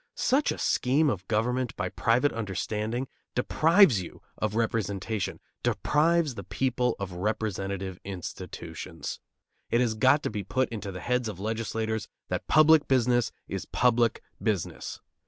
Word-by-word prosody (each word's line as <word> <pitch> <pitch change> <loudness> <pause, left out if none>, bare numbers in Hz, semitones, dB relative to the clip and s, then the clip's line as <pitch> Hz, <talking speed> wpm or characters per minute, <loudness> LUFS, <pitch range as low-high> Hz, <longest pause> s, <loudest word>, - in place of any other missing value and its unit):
Such 280 +3 +2
a - - -3
scheme 145 +4 +2
of 95 -4 -5
government 125 +3 0
by - - -2
private 125 +5 +2
understanding 110 +3 -2 0.3
deprives 160 - +5
you 85 - -10
of 110 -1 -2
representation, 110 -2 -1 0.2
deprives 160 -1 +2
the - - -7
people 125 -2 0
of 100 -2 -4
representative 95 -1 -2
institutions. 95 -3 -6 0.5
It 115 - +3
has 120 -3 +2
got 130 +7 +4
to - - -1
be 105 -2 -3
put 130 +7 0
into 105 -3 -5
the 90 - -7
heads 125 -2 0
of 100 -4 -7
legislators 110 +1 -2 0.2
that - - -3
public 155 0 +6
business 120 -3 +3 0.2
is - - -4
public 120 -2 +2 0.2
business. 105 -7 -2
115 Hz, 140 wpm, -28 LUFS, 105-130 Hz, 0.5 s, public